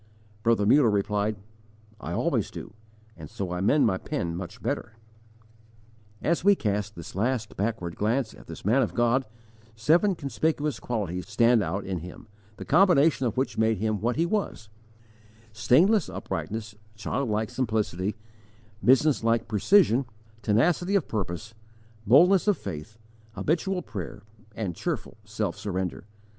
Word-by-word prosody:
Brother 115 Hz, -2 st, +2 dB
Muller 130 Hz, +2 st, +5 dB
replied: 105 Hz, +1 st, 0 dB, 0.6 s
"I -, -, -6 dB
always -, -, 0 dB
do, -, -, -9 dB, 0.4 s
and 80 Hz, -3 st, -10 dB
so 95 Hz, -3 st, -5 dB
I 90 Hz, 0 st, -2 dB
mend 140 Hz, +9 st, +4 dB
my 95 Hz, -4 st, +1 dB
pen 85 Hz, -1 st, -3 dB
much 90 Hz, 0 st, -7 dB
better." 110 Hz, -, -3 dB, 1.3 s
As 170 Hz, +1 st, +1 dB
we 200 Hz, +1 st, +6 dB
cast 105 Hz, -, -2 dB
this 85 Hz, -, -9 dB
last 110 Hz, +2 st, -1 dB
backward 100 Hz, -5 st, -3 dB
glance 110 Hz, +3 st, 0 dB
at -, -, -15 dB
this -, -, -9 dB
man 120 Hz, +7 st, +4 dB
of 100 Hz, -8 st, -1 dB
God, 120 Hz, +3 st, +2 dB, 0.5 s
seven 165 Hz, -, +3 dB
conspicuous 145 Hz, -1 st, -1 dB
qualities 100 Hz, -6 st, -3 dB
stand 115 Hz, +2 st, +4 dB
out 95 Hz, 0 st, -3 dB
in 95 Hz, -2 st, -3 dB
him, 90 Hz, +8 st, -10 dB, 0.3 s
the -, -, -7 dB
combination 160 Hz, -6 st, +4 dB
of 115 Hz, -, -4 dB
which 130 Hz, -3 st, -1 dB
made 110 Hz, -1 st, +2 dB
him 110 Hz, 0 st, -1 dB
what 120 Hz, +2 st, 0 dB
he 165 Hz, -, +2 dB
was: 175 Hz, -, -2 dB, 0.8 s
Stainless 150 Hz, -, +3 dB
uprightness, 110 Hz, 0 st, -5 dB, 0.2 s
child 110 Hz, +4 st, -2 dB
like 110 Hz, 0 st, -1 dB
simplicity, 105 Hz, -5 st, -1 dB, 0.7 s
business 135 Hz, +1 st, +4 dB
like 115 Hz, 0 st, +1 dB
precision, 130 Hz, -, +4 dB, 0.4 s
tenacity 175 Hz, -, +2 dB
of 195 Hz, -, +1 dB
purpose, 105 Hz, +1 st, -4 dB, 0.5 s
boldness 180 Hz, -, +6 dB
of 205 Hz, -, +3 dB
faith, 95 Hz, +4 st, -7 dB, 0.4 s
habitual 180 Hz, -, -1 dB
prayer, 100 Hz, -, -7 dB, 0.3 s
and 100 Hz, -5 st, -3 dB
cheerful 105 Hz, -, -4 dB
self 105 Hz, -4 st, -3 dB
surrender. 95 Hz, -3 st, -4 dB
110 Hz, 140 wpm, -26 LUFS, 100-140 Hz, 1.3 s, we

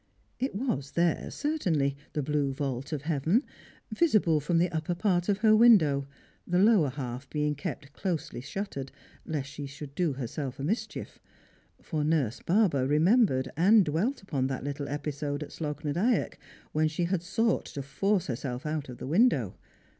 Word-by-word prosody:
It 260 Hz, -5 st, -2 dB
was 205 Hz, -, -2 dB
there 170 Hz, -1 st, +1 dB
certainly 175 Hz, -, 0 dB
— -, -, -34 dB
the 150 Hz, -, -1 dB
blue 145 Hz, -1 st, 0 dB
vault 135 Hz, 0 st, -3 dB
of 145 Hz, -3 st, -3 dB
heaven 165 Hz, -, +1 dB, 0.3 s
— -, -, -29 dB
visible 215 Hz, -, +3 dB
from 160 Hz, +4 st, 0 dB
the 175 Hz, +1 st, +2 dB
upper 160 Hz, +1 st, -2 dB
j^art 175 Hz, -1 st, +1 dB
of 200 Hz, -, +3 dB
her 215 Hz, 0 st, +7 dB
window, 160 Hz, -12 st, +5 dB, 0.4 s
the 180 Hz, -, +1 dB
lower 195 Hz, -6 st, +5 dB
half 130 Hz, 0 st, -6 dB
being 150 Hz, -1 st, 0 dB
kept 145 Hz, 0 st, -6 dB
closely 170 Hz, -9 st, -3 dB
shuttered 140 Hz, -3 st, -5 dB, 0.4 s
lest 145 Hz, -3 st, -3 dB
she 145 Hz, -1 st, -6 dB
should 140 Hz, 0 st, -9 dB
do 165 Hz, -1 st, 0 dB
herself 135 Hz, +1 st, -5 dB
a -, -, -4 dB
mischief; 215 Hz, +7 st, -3 dB, 0.6 s
for 155 Hz, -4 st, -2 dB
Nurse 150 Hz, -7 st, +1 dB
Barber 170 Hz, -9 st, +2 dB
remembered 155 Hz, -, +3 dB
and 195 Hz, +5 st, +5 dB
dwelt 190 Hz, -, -1 dB
upon 135 Hz, -8 st, -1 dB
that 135 Hz, -1 st, -4 dB
little 145 Hz, 0 st, -4 dB
episode 145 Hz, 0 st, -3 dB
at -, -, -10 dB
Slogh 150 Hz, -1 st, -5 dB
na 145 Hz, -, 0 dB
Dyack 210 Hz, -, 0 dB, 0.3 s
when 155 Hz, +1 st, +2 dB
she 155 Hz, +3 st, -2 dB
had 175 Hz, 0 st, 0 dB
sought 225 Hz, +6 st, 0 dB
to 140 Hz, -, -6 dB
force 195 Hz, +7 st, 0 dB
herself 125 Hz, +1 st, -4 dB
out 150 Hz, -2 st, -3 dB
of 125 Hz, -, -8 dB
the -, -, -7 dB
window. 150 Hz, -, +3 dB
155 Hz, 175 wpm, -29 LUFS, 140-190 Hz, 0.6 s, her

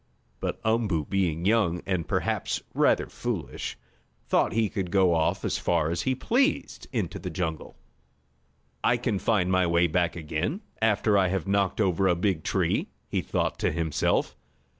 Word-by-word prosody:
But -, -, -3 dB
Umboo 110 Hz, -9 st, +1 dB
being 90 Hz, -4 st, 0 dB
young, 100 Hz, -5 st, +2 dB
and 90 Hz, -3 st, -1 dB
perhaps -, -, -1 dB
rather -, -, +3 dB
foolish, -, -, -4 dB, 0.5 s
thought -, -, +2 dB
he 110 Hz, +1 st, +2 dB
could 95 Hz, -3 st, -3 dB
go 95 Hz, -2 st, +4 dB
off 80 Hz, -1 st, 0 dB
as -, -, 0 dB
far 80 Hz, -2 st, +1 dB
as 85 Hz, -, -1 dB
he 130 Hz, -, 0 dB
pleased 265 Hz, -, 0 dB
into 110 Hz, -, -2 dB
the 90 Hz, -, -5 dB
jungle. 80 Hz, -3 st, -4 dB, 1.1 s
"I 120 Hz, -, +3 dB
can 115 Hz, -5 st, -1 dB
find 95 Hz, -5 st, +1 dB
my 95 Hz, -1 st, +3 dB
way 85 Hz, +1 st, +3 dB
back 85 Hz, +1 st, +1 dB
again, 85 Hz, -, -3 dB, 0.2 s
after 105 Hz, -2 st, +3 dB
I 95 Hz, -, +3 dB
have 95 Hz, -1 st, -1 dB
knocked 100 Hz, 0 st, +1 dB
over 95 Hz, -2 st, +2 dB
a 90 Hz, -, +3 dB
big 90 Hz, -3 st, 0 dB
tree," -, -, 0 dB, 0.2 s
he -, -, 0 dB
thought -, -, -1 dB
to -, -, +1 dB
himself. 80 Hz, -1 st, 0 dB
95 Hz, 160 wpm, -27 LUFS, 85-105 Hz, 1.1 s, go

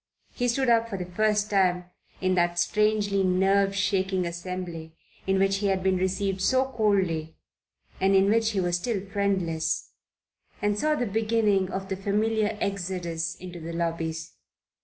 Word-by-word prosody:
He 245 Hz, -, -1 dB
stood 260 Hz, +2 st, +1 dB
up 230 Hz, -1 st, +3 dB
for 200 Hz, -, -4 dB
the 180 Hz, -, -4 dB
first 210 Hz, +3 st, 0 dB
time 180 Hz, -3 st, +2 dB, 0.4 s
in 185 Hz, 0 st, +2 dB
that 175 Hz, -1 st, +1 dB
strangely 210 Hz, +2 st, +2 dB
nerve 195 Hz, +2 st, +2 dB
shaking 190 Hz, -2 st, 0 dB
assembly 170 Hz, -2 st, -6 dB, 0.3 s
in 195 Hz, 0 st, +2 dB
which 195 Hz, 0 st, +2 dB
he 200 Hz, 0 st, -1 dB
had 190 Hz, -1 st, 0 dB
been 190 Hz, -1 st, +2 dB
received 190 Hz, +1 st, -1 dB
so 260 Hz, +6 st, +3 dB
coldly 190 Hz, -9 st, 0 dB, 0.6 s
and 195 Hz, +1 st, +3 dB
in 190 Hz, 0 st, +5 dB
which 225 Hz, +1 st, +3 dB
he 205 Hz, -3 st, -1 dB
was 175 Hz, -1 st, +1 dB
still 200 Hz, 0 st, -3 dB
friendless, 195 Hz, -5 st, -1 dB, 0.7 s
and 205 Hz, 0 st, 0 dB
saw 305 Hz, +4 st, +2 dB
the 245 Hz, -, -1 dB
beginning 215 Hz, -3 st, +1 dB
of 195 Hz, 0 st, -4 dB
the 190 Hz, -, -2 dB
familiar 210 Hz, +2 st, 0 dB
exodus 175 Hz, -4 st, -3 dB
into 180 Hz, -1 st, -9 dB
the 165 Hz, +1 st, -6 dB
lobbies. 165 Hz, -1 st, -3 dB
195 Hz, 160 wpm, -26 LUFS, 180-210 Hz, 0.7 s, in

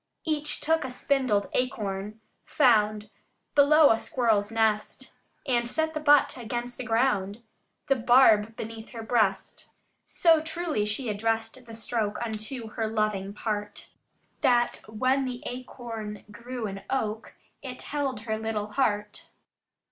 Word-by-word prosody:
Each 300 Hz, -2 st, -2 dB
took 320 Hz, +1 st, +1 dB
a 260 Hz, -, -4 dB
spindled 255 Hz, -5 st, 0 dB
acorn, 210 Hz, -4 st, -2 dB, 0.2 s
found 215 Hz, -6 st, +2 dB, 0.4 s
Below 295 Hz, +1 st, +6 dB
a 225 Hz, -, +2 dB
squirrel's 225 Hz, -7 st, +1 dB
nest, 220 Hz, +3 st, 0 dB, 0.3 s
And 240 Hz, -3 st, +1 dB
set 315 Hz, +3 st, -1 dB
the 310 Hz, -, -2 dB
butt 290 Hz, -3 st, +4 dB
against 240 Hz, +1 st, -5 dB
the -, -, -3 dB
ground, 225 Hz, -3 st, 0 dB, 0.4 s
The 275 Hz, -2 st, +3 dB
barb 225 Hz, -3 st, +5 dB
beneath 225 Hz, 0 st, -7 dB
her 225 Hz, -1 st, -6 dB
breast: 220 Hz, -4 st, 0 dB, 0.4 s
So 325 Hz, -2 st, +4 dB
truly 320 Hz, -8 st, -2 dB
she 225 Hz, +5 st, -2 dB
addressed 225 Hz, +3 st, -2 dB
the 225 Hz, -, -9 dB
stroke 220 Hz, -1 st, -2 dB
unto 220 Hz, +2 st, -5 dB
her 220 Hz, 0 st, -2 dB
loving 215 Hz, -3 st, -1 dB
part, 210 Hz, -1 st, -4 dB, 0.5 s
That 245 Hz, -3 st, +3 dB
when 255 Hz, +5 st, +1 dB
the 250 Hz, -1 st, -5 dB
acorn 230 Hz, -4 st, -7 dB
grew 240 Hz, +2 st, -6 dB
an 195 Hz, -1 st, -5 dB
oak, 220 Hz, -4 st, -3 dB, 0.3 s
it 255 Hz, -2 st, -7 dB
held 275 Hz, -6 st, -2 dB
her 220 Hz, -1 st, -3 dB
little 215 Hz, -1 st, -3 dB
heart. 210 Hz, -5 st, -1 dB
230 Hz, 135 wpm, -27 LUFS, 215-260 Hz, 0.5 s, Below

